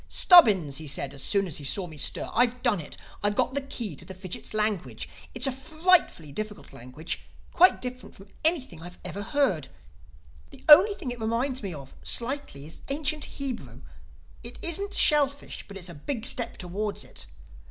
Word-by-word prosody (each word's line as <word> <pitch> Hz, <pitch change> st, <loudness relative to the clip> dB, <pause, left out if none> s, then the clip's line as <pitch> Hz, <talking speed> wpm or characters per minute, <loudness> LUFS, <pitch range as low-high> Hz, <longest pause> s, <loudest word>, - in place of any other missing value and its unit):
"Stubbins," 200 Hz, -, +6 dB
he 155 Hz, -1 st, -5 dB
said 140 Hz, -1 st, -1 dB
as 140 Hz, -, -7 dB
soon 200 Hz, +6 st, +1 dB
as 170 Hz, -6 st, -3 dB
he 145 Hz, -, -8 dB
saw 180 Hz, +7 st, +1 dB
me 160 Hz, -3 st, -10 dB
stir, 145 Hz, -, +1 dB
"I've 245 Hz, +1 st, +1 dB
done 235 Hz, -7 st, +2 dB
it. 155 Hz, -, -8 dB, 0.2 s
I've 205 Hz, 0 st, 0 dB
got 260 Hz, -, +1 dB
the 280 Hz, -, -1 dB
key 235 Hz, -, -5 dB
to -, -, -8 dB
the 190 Hz, -, -10 dB
fidgit's 185 Hz, +3 st, -6 dB
language. 200 Hz, -, -2 dB, 0.3 s
It's 240 Hz, +2 st, +5 dB
a 270 Hz, -, +2 dB
frightfully 310 Hz, -, +1 dB
difficult 210 Hz, 0 st, -7 dB
language—quite 150 Hz, -, 0 dB
different 250 Hz, 0 st, -7 dB
from 195 Hz, +1 st, -15 dB
anything 285 Hz, -, +1 dB
I 175 Hz, -, -8 dB, 0.2 s
ever 200 Hz, -, -5 dB
heard. 230 Hz, -, 0 dB, 0.8 s
The -, -, -16 dB
only 365 Hz, +8 st, +8 dB
thing 275 Hz, -11 st, -5 dB
it 245 Hz, -2 st, -7 dB
reminds 245 Hz, +4 st, -1 dB
me 195 Hz, -3 st, -5 dB
of—slightly—is 160 Hz, -, -4 dB
ancient 300 Hz, +1 st, -1 dB
Hebrew. 270 Hz, -4 st, -7 dB, 0.6 s
It -, -, -9 dB
isn't 395 Hz, +4 st, -1 dB
shellfish; 285 Hz, -1 st, +3 dB
but 200 Hz, -, -9 dB
it's 185 Hz, -2 st, -5 dB
a 170 Hz, -, -9 dB
big 220 Hz, -, -4 dB
step 240 Hz, -3 st, +2 dB
towards 200 Hz, +4 st, -4 dB
it. -, -, -8 dB
220 Hz, 175 wpm, -27 LUFS, 175-275 Hz, 0.8 s, only